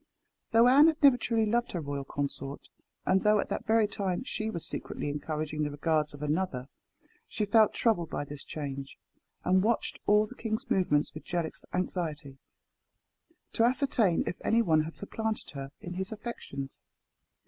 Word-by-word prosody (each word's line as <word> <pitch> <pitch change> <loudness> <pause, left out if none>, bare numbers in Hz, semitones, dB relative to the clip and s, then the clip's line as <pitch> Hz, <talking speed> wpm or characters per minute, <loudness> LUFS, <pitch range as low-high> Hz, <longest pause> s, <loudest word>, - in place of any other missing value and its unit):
Though 230 +1 +6
Anne 280 +5 +8
had 315 -1 0
never 275 -3 +8
truly 230 -2 +1
loved 235 +3 0
her 175 - -1
royal 140 -2 -4
consort, 140 0 -4 0.4
and 190 0 +3
though 210 0 +4
at - - -2
that - - -3
very 220 0 +4
time 195 0 -2
she 220 -4 -3
was 170 -7 -3
secretly - - -4
encouraging 155 +1 -3
the 150 - 0
regards 150 0 0
of 145 - -8
another, 150 -4 -1 0.6
she 210 - -2
felt 215 +1 +4
troubled 175 -9 +1
by 145 - -3
this 145 -1 -9
change, 140 -2 -6 0.5
and 185 +1 +4
watched 225 +3 0
all 210 +1 +5
the 215 - -11
king's 220 -3 -4
movements 150 -6 +2
with 155 - -8
jealous 170 -2 -3
anxiety, 155 -6 -3 1.1
to 225 - +2
ascertain 245 - +3
if 180 - -3
any 230 +1 +3
one 160 -6 +4
had 165 - -8
supplanted 220 +2 -3
her 135 -1 -6
in 175 - -6
his 190 +3 -3
affections. 210 - -6
180 Hz, 170 wpm, -30 LUFS, 150-220 Hz, 1.1 s, Anne